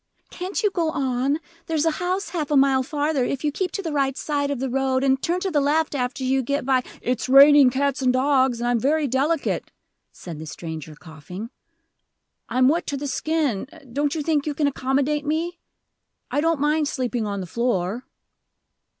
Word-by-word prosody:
"Can't 375 +4 -4
you 415 - +3
go 335 -4 0
on? 270 0 0 0.3
There's 320 -1 0
a 325 - +3
house 370 +3 -1
half 315 -5 -3
a 295 - +3
mile 270 -1 +4
farther, 290 0 -1
if 265 +2 -2
you 300 - +1
keep 365 +5 -2
to 395 - -3
the 325 - -3
right 280 -2 +2
hand 270 +1 -5
side 285 -2 -1
of 285 - -1
the 265 - -1
road, 265 0 0
and 265 -1 +2
turn 350 +2 0
to 385 - -1
the 295 -3 +2
left 300 +3 +1
after 250 -1 -2
you 265 +1 +2
get 280 +2 -2
by 260 -1 +3
" - - -23
"It's 250 +1 -1
raining 280 0 +8
cats 275 +1 -1
and 255 -1 +3
dogs, 260 -1 +2
and 240 - -1
I'm 240 -1 +2
very 295 +5 +1
delicate," 275 +5 0 0.4
said 165 -4 -9
the 160 - -7
stranger, 155 0 -7
coughing. 180 - -9 1.0
"I'm 255 +2 +3
wet 330 +5 +1
to 285 - -2
the 285 - -5
skin: 285 -6 -1 0.3
don't 290 +3 0
you 310 - -2
think 305 -1 0
you 295 - -2
can 295 - +1
accommodate 285 +2 0
me? 330 +4 -2 0.7
I 290 - +1
don't 325 -1 +1
mind 300 +1 +1
sleeping 245 -5 -2
on 200 -1 -3
the 185 - -4
floor." 235 +1 -2
275 Hz, 200 wpm, -23 LUFS, 255-300 Hz, 1.0 s, raining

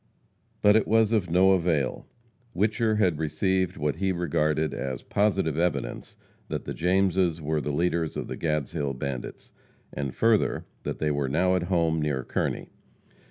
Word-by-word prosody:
But 105 0 +6
it 110 - +3
was 110 0 +3
of 105 -6 +1
no 95 +3 +5
avail. 85 -7 0 0.5
Whicher 110 +2 +1
had 90 -8 +2
received 95 +4 0
what 75 -2 -1
he 95 -1 0
regarded 75 -3 0
as 65 -2 -4
positive 95 -7 +1
evidence 90 +1 -2 0.3
that - - -4
the - - -4
Jameses 90 -1 +1
were 75 0 -1
the 75 - -3
leaders 85 +1 0
of - - -4
the - - -5
Gadshill 75 -3 -2
bandits, 65 -2 -6 0.4
and, 70 -2 -4
further, 115 -2 +2 0.2
that - - -4
they 75 -1 0
were 70 -2 -1
now 90 +6 +2
at 90 - +1
home, 80 -3 +1
near 70 -4 -1
Kearney. - - -2
85 Hz, 160 wpm, -26 LUFS, 75-95 Hz, 0.5 s, But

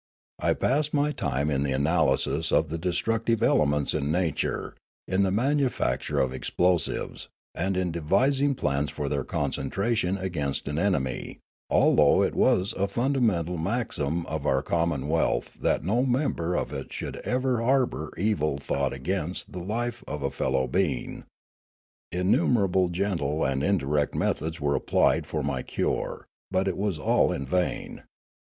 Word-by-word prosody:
I - - +2
passed 150 +3 +1
my 145 +1 +2
time 70 - -1
in 70 -1 +1
the 70 -1 0
analysis 75 +1 +1
of 80 - +3
the 80 +1 -3
destructive 115 +6 0
elements 75 -1 +2
in 75 -1 -1
nature, 85 -2 -1 0.3
in 95 +1 +1
the 95 - +3
manufac 130 +6 +1
ture - - -4
of 65 -1 +1
explosives, 85 +4 -1 0.3
and 95 +2 -1
in 90 -2 0
devising 130 - +2
plans 70 - 0
for 75 - -4
their 70 -1 -1
concentration 100 - -1
against 85 -9 -3
an 75 +2 -1
enemy, 70 -10 -1 0.3
although - - +5
it - - 0
was 95 +2 +2
a 100 +1 0
fundamental 105 - 0
maxim 85 - -1
of 80 -2 -3
our 65 +1 +2
commonwealth 80 -2 0
that - - +1
no 110 +9 +1
mem 135 +3 +1
ber 85 +2 -2
of 70 - -2
it 70 -1 -6
should - - -5
ever 125 -1 0
harbour 120 - +1
evil 90 -8 0
thought 70 -1 -1
against 85 +5 -3
the 90 - -6
life 120 +6 -3
of 75 -1 -4
a 70 - -1
fellow 65 0 0
being. 80 -9 -1 0.9
Innumerable 95 0 +2
gentle 85 -5 -1
and 70 +1 0
indirect 75 -6 +1
methods 80 +2 -1
were 70 -1 +1
applied 80 +2 +2
for 80 -2 -2
my 70 -3 -1
cure; - - -2 0.2
but 95 +1 0
it 95 - 0
was 100 -4 0
all 70 - +2
in 70 - -3
vain. 90 +7 -2
85 Hz, 150 wpm, -27 LUFS, 75-100 Hz, 0.9 s, although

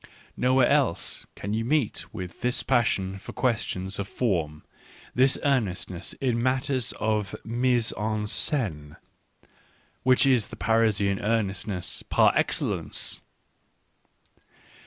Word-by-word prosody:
Nowhere 130 0 +3
else 140 - +1
can 100 +2 -4
you 110 +1 0
meet 135 -2 0
with 90 -4 -7
this 125 0 +1
passion 100 -6 +1
for - - -9
questions 100 -6 -1
of 100 - -3
form, 85 -11 -1 0.5
this 130 +2 +4
earnestness 100 -10 -1
in 125 -4 -1
matters 130 -1 0
of 105 -2 -1
fnise 120 0 +1
en 110 0 -1
scene, 95 - -1 1.1
which 130 +2 +4
is 125 -6 +3
the - - -9
Parisian 105 -3 +2
earnestness 100 -4 -2
par - - +5
excellence. - - -1
110 Hz, 110 wpm, -26 LUFS, 95-125 Hz, 1.1 s, par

